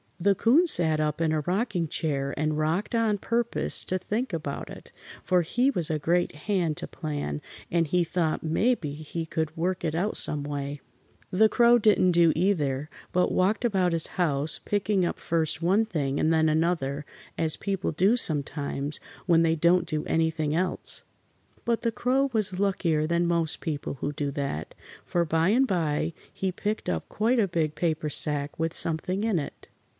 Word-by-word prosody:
The 200 +3 +3
'Coon 270 - +4
sat 160 - +5
up 150 0 -1
in 165 -1 +1
a 155 -1 0
rocking 185 - -1
chair 140 -3 -2
and 155 0 -1
rocked 160 +9 -1
on 225 -3 +1
purpose 235 +3 -1
to 185 - -1
think 215 +4 -3
about 150 -4 -4
it, - - -12 0.3
for 180 -1 +2
he 245 - +1
was 175 - +1
a 155 - 0
great 175 +4 +1 0.2
hand 175 -7 0
to - - -3
plan, 145 - -4 0.3
and 165 -1 +1
he 175 +3 +2
thought 165 -2 -1
mebbe 210 +9 +1
he 155 +3 -5
could 160 0 -3
work 180 +2 -1
it 160 -2 -1
out 195 +6 -1
some 150 -1 +3
way. 145 0 -4 0.5
The 215 +4 +4
Crow 240 +2 +5
didn't 205 -4 +4
do 170 -1 +4
either, 150 -6 0 0.2
but 180 0 +1
walked 205 +6 +1
about 190 -6 +1
his 165 -1 +4
house, 150 -2 +1
picking 205 -2 0
up - - -3
first 160 -1 -1
one 195 +6 +2
thing 145 -8 -2
and 160 - +2
then 160 -1 +3
another, 155 -3 0 0.3
as 160 -2 0
people 195 -2 -2
do 190 +8 +3
sometimes 145 - -2 0.3
when 170 -2 +4
they 165 -1 +2
don't 170 +3 +3
do 155 -1 -2
anything 160 -2 0
else. 180 +2 -1 0.6
But 235 -1 0
the 230 - 0
Crow 260 +5 +1
was 205 -5 0
luckier 170 -6 +1
than 170 +1 +1
most 170 -2 0
people 150 -3 -4
who 145 +2 -4
do 145 0 -2
that, 140 - -4 0.3
for 175 -1 0
by 165 +2 +1
and 250 +6 +4
by 165 -4 -1 0.2
he 190 -1 -2
picked 210 +4 -3
up 80 -2 -3
quite 235 +4 +1
a 205 - +3
big 160 -4 -1
paper 155 -3 -1
sack 145 -1 +5
with 165 0 -1
something 180 +5 -1
in 220 -6 +1
it. 145 - -8
170 Hz, 180 wpm, -26 LUFS, 155-195 Hz, 0.6 s, sat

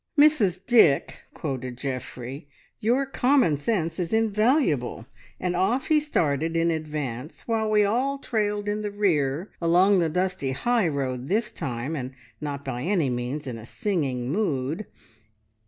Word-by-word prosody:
"`Mrs 215 - +4
Dick,' 220 - +4
quoted 130 -4 -4
Geoffrey, 130 +1 -6 0.3
`your 260 +5 +1
common 255 - +3
sense 165 +1 -1
is 175 -2 -2
invaluable!' 215 - +1 0.3
and 180 -1 -1
off 200 +9 +1
he 310 -1 +5
started 165 - 0
in 165 0 +2
advance 150 -4 -5
while 220 -2 0
we 210 -1 +4
all 255 +7 0
trailed 210 -5 -1
in 210 +1 -1
the 210 - -2
rear, 170 -5 0
along 180 +4 +4
the 165 -2 +2
dusty 180 -5 -1
high 230 - +1
road 130 -4 -2
this 215 +4 0
time, 130 +4 -4
and 130 -2 -5 0.3
not 140 -2 -4
by 125 -2 -3
any 165 -4 +1
means 125 +5 -3
in 120 -4 -5
a 110 - -10
singing 140 - -2
mood. 160 -1 -1
170 Hz, 145 wpm, -25 LUFS, 140-215 Hz, 0.3 s, he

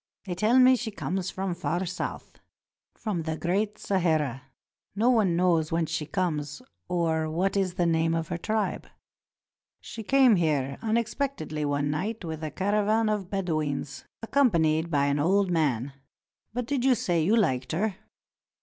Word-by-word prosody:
They 185 - -3
tell 215 +7 +2
me 255 0 +7
she 245 -2 -3
comes 190 -3 -3
from 190 -1 -3
far 175 +1 -2
south 180 - -6 0.3
— - - -65
from 205 -7 -3
the 160 0 -3
Great 205 +6 -1
Sahara. 155 - 0 0.5
No 230 +5 +3
one 210 -8 +3
knows 170 -3 +2
whence 165 -1 0
she 150 - -2
comes, 150 -5 -2 0.3
or 160 -3 0
what 180 +6 0
is 190 -3 0
the 175 -2 +1
name 165 0 +2
of 165 -1 -3
her 175 - -2
tribe. 215 +3 -2 0.9
She 225 - -8
came 255 -1 +5
here 145 -5 0
unexpectedly 225 - -2
one 145 0 0
night 205 +6 -3
with 160 -1 -5
a 155 - -2
caravan 210 +4 +1
of 205 -4 -2
Bedouins, 155 -8 -2 0.2
accompanied 170 - +2
by 140 -3 +2
an 140 +1 +1
old 190 +4 +2
man. 140 -6 0 0.6
But 245 +2 -3
did 265 0 -1
you 260 -1 +4
say 180 -10 0
you 195 +8 +3
liked 130 - +1
her? 195 +3 -1
175 Hz, 160 wpm, -27 LUFS, 155-215 Hz, 0.9 s, me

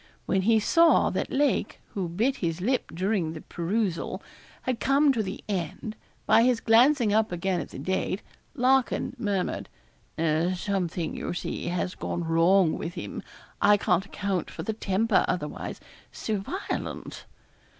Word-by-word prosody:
When 190 - +1
he 220 +3 +4
saw 330 +10 +4
that - - -2
Lake, 280 -6 +1
who 185 -4 -2
bit 230 +11 0
his 165 -2 -2
lip 245 +8 0
during 185 -2 -1
the 160 - -8
perusal, 180 +1 -2 0.4
had 255 -2 -1
come 275 +1 +4
to 230 - 0
the 190 -2 -5
end, 200 +2 -3 0.3
by 225 - +6
his 245 -1 +3
glancing 235 0 +4
up 220 -1 +2
again 180 +1 -1
at - - -8
the - - -9
date, 190 +1 -2 0.3
Larkin 260 -2 +2
murmured 200 -5 -1 0.5
'Something, 170 +1 0
you - - -4
see, - - -4
has 180 +1 -1
gone 175 - -3
wrong 165 +2 +3
with 170 +2 -5
him. - - -5 0.4
I 205 0 +6
can't 190 -1 +1
account 195 -4 -2
for - - -7
the 220 - -2
temper 210 0 +2
otherwise 150 -4 -3 0.3
so 215 -2 -2
violent.' 370 - -5
195 Hz, 150 wpm, -27 LUFS, 175-230 Hz, 0.5 s, by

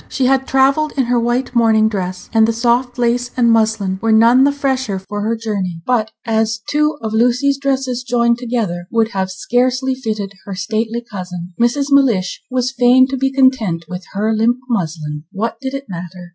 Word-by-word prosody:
She 265 - -1
had 265 +1 +2
travelled 275 +3 +2
in 265 - +3
her 245 0 +1
white 240 +2 -1
morning 220 -2 +4
dress, 185 -4 -4
and 220 -1 +4
the 230 - 0
soft 240 +2 0
lace 245 0 0
and 235 -2 +4
muslin 215 -4 +1
were 225 - +1
none 235 +4 +5
the 285 - +3
fresher 265 -7 -1
for 205 +2 -6
her 220 +2 0
journey; 200 -6 -3
but 230 -4 +1 0.2
as 225 0 0
two 300 0 +1
of 220 -1 -3
Lucy's 250 +5 +2
dresses 265 -3 -1
joined 235 -1 +1
together 225 -8 -2
would 225 -1 +1
have 190 -4 -2
scarcely 245 +8 0
fitted 215 -6 -4
her 200 - -6
stately 220 +4 -2
cousin, 180 -3 -7
Mrs. 275 +4 +1
Mellish 215 - +2
was 255 0 -1
fain 250 +1 +5
to 270 - -2
be 270 +1 0
content 260 -11 +1
with 180 +1 -7
her 215 +3 0
limp 230 +3 +2
muslin. 155 -8 -3
What 225 +4 -3
did 265 0 -4
it 275 0 -6
matter? 180 0 -8
230 Hz, 185 wpm, -17 LUFS, 200-255 Hz, 0.2 s, none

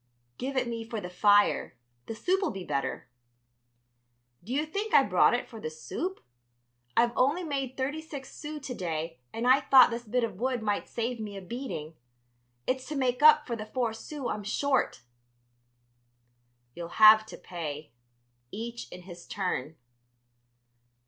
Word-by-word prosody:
"Give 265 +1 -3
it 250 -1 +1
me 230 -1 -4
for 225 -1 -5
the 180 -3 -7
fire; 205 -4 +3 0.3
the 225 - -5
soup'll 380 - +1
be 195 -2 -6
better." 140 -5 -3 1.4
"Do 215 - -9
you 290 +4 +1
think 405 +7 -2
I - - +8
brought - - +4
it - - -3
for 225 -3 -10
the 155 - -3
soup? 335 - -5 0.8
I've 235 0 +5
only 290 +8 +2
made 275 -5 -3
thirty 280 +4 -2
six 285 -4 -9
sous 300 -2 -7
to 255 - -4
day 165 - -4
and 230 +2 -2
I 260 +2 +7
thought 260 -2 +7
this 235 +1 -3
bit 245 +3 +1
of 205 -5 -3
wood 250 -1 -1
might 205 -1 -1
save 235 +1 -3
me 205 -2 -6
a - - -7
beating. 180 - -5 0.7
It's 260 0 -1
to 305 - -4
make 255 -1 0
up 305 0 +8
for 240 - -3
the 215 -1 -7
four 235 -1 -1
sous 265 +4 -6
I'm 210 - -3
short." 265 - 0 1.7
"You'll 170 +3 -8
have 215 0 +9
to - - -9
pay. 155 -4 -6 0.6
Each 235 +3 -6
in 180 0 -10
his 175 -1 -11
turn." 165 -6 -3
235 Hz, 160 wpm, -29 LUFS, 195-270 Hz, 1.7 s, have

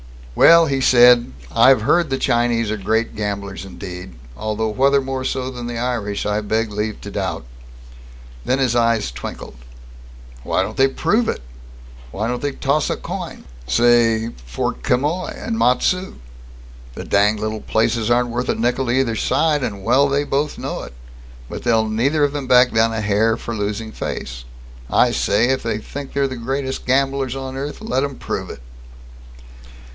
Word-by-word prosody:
"Well," 165 - +7
he 135 -3 -1
said, 120 - +6 0.2
"I've 130 -4 +5
heard 170 +6 +2
the 135 - 0
Chinese 120 -3 +1
are 110 - -2
great 110 +3 -1
gamblers 100 -2 -4
indeed, 90 -4 -9 0.2
although 110 +1 -2
whether 135 +5 +3
more 135 -1 -4
so 130 0 -2
than 120 -2 -6
the 120 -1 -4
Irish 115 -4 -2
I 105 +1 0
beg 110 +1 -1
leave 105 +1 -3
to - - -8
doubt." - - -3 1.0
Then 130 - +1
his 130 -3 +1
eyes 115 - +2
twinkled. - - -8 0.9
"Why - - 0
don't - - -6
they 135 - +5
prove 205 - 0
it? - - -3 0.7
Why 105 - -3
don't 125 +1 -3
they 145 -1 -2
toss 140 +3 0
a - - 0
coin, - - -7 0.2
say, 115 -1 +3 0.2
for - - -2
Quemoy 145 - -1
and 225 0 -4
Matsu? 180 +9 +1 0.8
The - - -6
danged 105 +1 +2
little 110 0 -3
places 115 0 0
aren't 120 0 +2
worth 120 +2 -3
a - - +1
nickel 125 +3 0
to - - +1
either 125 -4 +1
side, 150 +4 +1
and 100 -5 -4
well 130 +6 +3
they 140 +1 +1
both 145 +1 -1
know - - -4
it. - - -10 0.6
But - - -6
they'll 115 -2 +2
neither 135 +8 +1
of 145 - +2
them 145 -3 -4
back 125 0 +5
down 115 0 +3
a 110 -1 -2
hair, 105 +2 +2
for 115 - -6
losing 105 +1 -3
face. - - -6 0.4
I - - +3
say, 110 +5 +1
if 130 - +1
they 115 -2 -2
think 140 +5 -8
they're 140 -1 +1
the 130 -1 -6
greatest 130 +3 -3
gamblers 135 0 +1
on 130 -1 -6
earth, 145 +8 -5
let 180 -12 -1
'em 140 -1 -3
prove - - -5
it!" - - -9
120 Hz, 175 wpm, -20 LUFS, 110-135 Hz, 1.0 s, Well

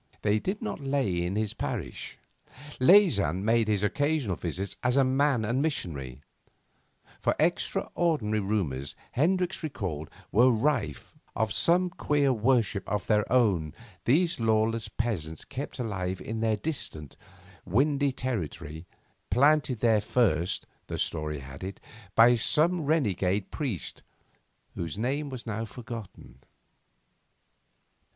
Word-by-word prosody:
They 105 0 +3
did 195 - -3
not 220 - -3
lie 140 0 -1
in 90 -4 -1
his 110 0 -1
parish: 105 - -5 0.6
Leysin 130 - +5
made 115 0 +3
his 105 -2 +1
occasional 145 - +1
visits 95 +7 -3
as 125 +1 +1
man 135 -2 +3
and 120 +5 0
missionary; 70 - -3 1.0
for - - +1
extraordinary 145 -12 +1
rumours, 75 -10 -2 0.2
Hendricks 180 +6 +1
recalled, 95 - -4 0.2
were 120 +5 +6
rife, 115 - -1 0.2
of 110 -1 0
some 180 +1 +3
queer 145 -5 +1
worship 115 -4 +1
of 105 -1 -1
their 105 -1 +1
own 100 -12 +2 0.3
these 165 +6 +2
lawless 115 0 +1
peasants 85 -10 -3
kept 140 +1 -6
alive 95 -6 -3
in 110 +1 -5
their 110 -1 +1
distant, 100 - -4 0.5
windy 140 - +2
territory, 85 - -4 0.4
planted 140 -3 +3
there 110 -3 +4
first, 95 -6 +1 0.2
the - - -4
story 75 -2 -2
had 70 +4 -10
it, 95 +1 -6 0.4
by 115 +2 +7
some 160 +9 +3
renegade 100 - +1
priest 130 - -3 0.7
whose 85 -1 -4
name 140 +6 -1
was 130 -3 -7
now 110 -1 -3
forgotten. 115 - -9
110 Hz, 120 wpm, -28 LUFS, 95-135 Hz, 1.0 s, by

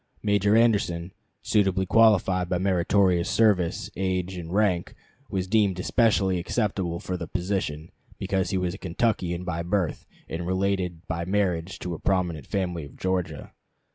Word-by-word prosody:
Major 105 +1 +3
Anderson, 95 -6 +1 0.3
suitably 95 -2 +2
qualified 95 -4 +4
by 90 - +1
meritorious 90 -1 +2
service, 100 -7 +2
age, 95 0 -1
and 85 -2 -7
rank, 95 -3 +1 0.3
was 95 -2 -1
deemed 100 -2 +2
especially 95 -3 +2
acceptable 90 -3 -1
for 90 0 -4
the 85 - -6
position 90 -5 -3 0.3
because 95 -2 -1
he 95 - 0
was 90 -1 -1
a 95 - -9
Kentuckian 90 -2 -1
by 85 -2 -3
birth, 90 -1 -1 0.2
and 85 +1 -4
related 95 -2 -1
by 85 -1 -3
marriage 95 -2 -1
to 90 - -5
a 80 - -6
prominent 90 -7 -1
family 90 -4 -2
of 70 - -12
Georgia. 90 -5 -3
90 Hz, 145 wpm, -26 LUFS, 85-100 Hz, 0.3 s, qualified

